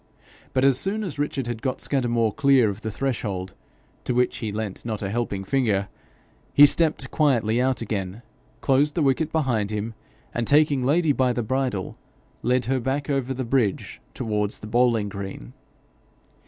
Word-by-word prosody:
But 130 0 +2
as 135 -2 +4
soon 210 +3 -1
as 165 -7 -5
Richard 145 -3 -1
had 120 -2 -4
got 130 -2 -2
Scudamore 120 -5 +1
clear 135 -6 +4
of 100 +2 -9
the 110 - -3
threshold, 105 -6 -3 0.5
to 125 - -1
which 125 0 +1
he 110 -3 -3
lent 105 -2 -4
not 110 -3 -4
a 95 - -2
helping 105 -4 -2
finger, 100 -3 0 0.7
he 145 - +10
stepped 150 -3 +2
quietly 120 -6 +2
out 130 -2 0
again, 100 0 -4 0.4
closed 145 +2 +2
the 165 - +1
wicket 145 +3 +1
behind 125 -10 0
him, 105 +1 -3 0.4
and 120 -2 -2
taking 145 -2 +4
Lady 155 +4 +3
by 130 -2 +2
the 120 - -2
bridle, 125 -5 -2 0.4
led 125 0 +1
her 130 +2 0
back 135 +4 -2
over 135 -2 -1
the 130 -1 -3
bridge 115 - -1
towards 105 -4 -1
the - - -10
bowling 115 -2 +2
green. 100 - -7
125 Hz, 170 wpm, -24 LUFS, 110-135 Hz, 0.7 s, he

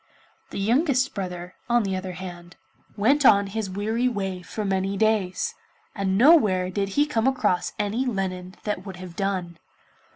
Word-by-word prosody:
The - - -7
youngest 255 - +2
brother, 180 -3 -5 0.2
on 240 -1 +3
the 195 -2 -1
other 185 0 -4
hand, 175 -1 -9 0.4
went 275 +8 +3
on 200 -5 +6
his 200 0 -3
weary 220 +6 0
way 195 -6 -2
for 210 +4 -5
many 195 0 0
days, 215 -4 +1 0.4
and 195 -2 0
nowhere 210 - +5
did 195 +1 -1
he 290 - +5
come 245 -5 0
across 210 -9 +1
any 220 +5 -1
linen 185 -4 -3
that 210 -3 -2
would 190 -2 -8
have 180 -1 -10
done. 185 -4 -2
195 Hz, 160 wpm, -25 LUFS, 185-225 Hz, 0.4 s, on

